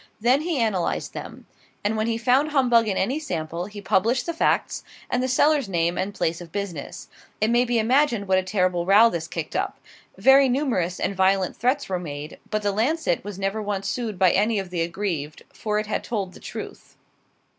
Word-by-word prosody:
Then 250 +6 +3
he 330 -1 -1
analyzed 215 -7 -1
them; - - -8 0.4
and 210 +2 0
when 215 +1 0
he 230 -1 0
found 260 +5 +2
humbug 245 -6 +3
in 195 - -1
any 255 +10 0
sample, 170 - -4
he 205 0 -9
published 230 +6 +1
the 335 - -2
facts, 325 - 0 0.3
and 250 - +1
the 255 - 0
seller's 280 -1 +3
name 170 -1 +1
and 190 +2 -2
place 170 -4 -2
of 170 -2 -11
business. 200 -7 -5 0.3
It 215 +2 +2
may 240 +1 +4
be 240 -1 0
imagined 235 -2 +2
what 190 0 +4
a - - 0
terrible 185 -2 0
row 215 +4 +7
this 165 -1 -3
kicked - - -5
up. - - -1 0.4
Very 270 0 +6
numerous 240 - 0
and 200 - -1
violent 190 0 +2
threats 260 +4 0
were 185 -2 -2
made; 150 -3 -7
but 215 0 -1
the 205 - +1
"Lancet," 225 - 0
was 205 -1 -7
never 195 +2 -2
once 200 -2 -3
sued 230 -5 -3
by 185 -1 +5
any 215 +3 +2
of 190 -2 -4
the 175 -2 -1
aggrieved, 165 -4 -3
for 210 -1 -2
it 215 - -1
had 215 - -2
told 195 -5 -3
the - - -13
truth. - - -9
205 Hz, 205 wpm, -24 LUFS, 185-245 Hz, 0.4 s, row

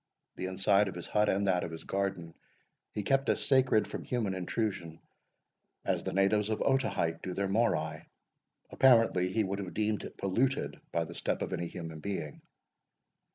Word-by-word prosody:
The 95 - -4
inside 95 +2 +3
of 95 - -5
his 90 - -6
hut, 105 0 +2
and 100 +1 +1
that 90 -2 +2
of - - -3
his 80 0 -8
garden, 95 -4 -2 0.6
he 105 - -3
kept 135 +5 +2
as - - +1
sacred 130 -5 +4
from - - -6
human 115 -6 -1
intrusion 90 -3 -3 0.9
as - - 0
the - - -3
natives 100 +2 +2
of 110 - -1
Otaheite 130 -12 +1
do 90 -1 -5
their 100 0 0
Morai; 80 -8 0 0.6
apparently 115 -8 +4
he 110 +2 +1
would 100 0 -3
have 95 -3 -6
deemed 110 -1 0
it - - -9
polluted 125 +8 0
by 85 - +1
the - - -9
step - - -2
of - - -4
any 85 - -2
human 80 -2 -7
being. 80 -5 -5
95 Hz, 175 wpm, -31 LUFS, 90-110 Hz, 0.9 s, sacred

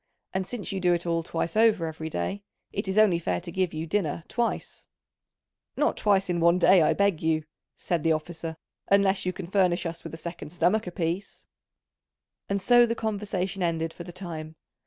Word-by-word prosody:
And 190 0 -1
since 235 -1 -4
you 195 - -2
do 180 -1 +3
it 170 - -4
all 170 -1 +1
twice 165 +1 -3
over 215 -5 +4
every 160 0 -5
day, 155 - -3 0.3
it 200 0 -3
is 190 +2 -1
only 205 -6 +5
fair 170 - -1
to 175 0 -8
give 185 0 0
you 160 0 -4
dinner 170 -1 -1
twice." 240 -1 -3 0.9
"Not - - +2
twice 195 -2 +2
in 175 -1 0
one 170 +1 +4
day, 185 0 +6
I 155 - +4
beg 200 -5 +1
you!" 160 -1 +1 0.3
said 175 -3 -1
the 165 - +2
officer, 160 +1 -5 0.3
"unless 195 -1 +3
you - - +2
can 185 0 -7
furnish 180 -1 +2
us 170 0 -5
with - - -7
a - - -9
second 170 -1 -7
stomach 180 +4 +2
apiece." 180 +2 -3 1.0
And 200 0 +1
so 240 +4 +5
the 230 - -1
conversation 200 -4 -2
ended 165 -1 -1
for 175 - -8
the 175 - -9
time. 165 -4 -7
180 Hz, 195 wpm, -27 LUFS, 165-200 Hz, 1.0 s, day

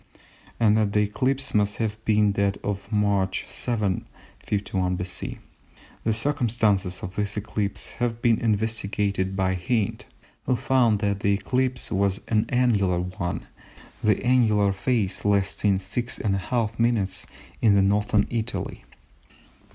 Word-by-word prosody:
and 110 -2 +4
that 105 -2 +1
the 105 - +4
eclipse 130 +6 -1
must 105 -1 +2
have 110 -1 -3
been 105 -1 +3
that 100 0 0
of 100 0 -4
March 100 -3 +1
7, 105 -7 -2 0.3
51 95 -3 -1
B.C. 90 0 -4 0.7
The 110 - +1
circumstances 110 - 0
of 90 +1 -6
this 105 0 -2
eclipse 105 -1 -3
have 120 -1 0
been 115 -2 +3
investigated 105 -3 0
by 95 -1 +1
Hind, 100 +4 -1 0.4
who 130 - +3
found 120 -4 +2
that 100 -2 0
the 100 0 +2
eclipse 125 +5 -1
was 100 -1 +1
an 110 0 +2
annular 105 -8 +2
one, 90 -1 -4 0.6
the 105 0 +3
annular 110 -6 +3
phase 100 -2 -1
lasting 100 0 +2
6½ 105 +1 -2
minutes 110 -6 0 0.3
in 100 -3 +5
Northern 105 0 +2
Italy. 115 -2 -3
105 Hz, 125 wpm, -25 LUFS, 100-115 Hz, 0.7 s, in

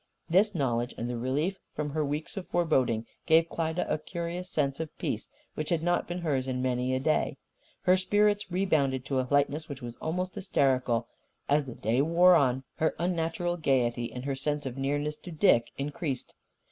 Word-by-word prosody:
This 195 +4 +3
knowledge, 120 -5 0
and 115 - -3
the 120 - -3
relief 145 +11 -1 0.2
from 150 -1 -2
her 155 +1 0
weeks 150 +7 -3
of 195 -3 -5
foreboding, 130 -10 +1 0.2
gave 165 0 +5
Klyda 165 +1 -1
a - - 0
curious 170 +2 -5
sense 140 -3 0
of 160 -2 -5
peace - - -3 0.2
which 155 - -4
had 165 -2 +1
not 175 +1 +1
been 175 - -3
hers 135 -6 0
in 130 -1 -1
many 125 0 0
a - - 0
day. 155 +3 +1 0.5
Her 185 - +5
spirits 205 +2 +2
rebounded 145 -8 +1
to 135 -2 0
a 130 - -1
lightness 145 +2 +1
which 140 -3 -7
was 120 -1 -7
almost 180 +3 -2
hysterical. 130 - +1 0.4
As 145 0 +3
the 125 - -7
day 115 +5 +1
wore 170 +4 +6
on, 135 -5 +3
her 160 - +1
unnatural 175 0 -1
gaiety 120 -6 +1
and 125 +2 -6
her 140 - 0
sense 145 +2 -2
of 130 -2 -4
nearness 145 +2 -1
to - - -11
Dick 150 - +4
increased. 140 -1 -3
150 Hz, 185 wpm, -29 LUFS, 130-170 Hz, 0.5 s, wore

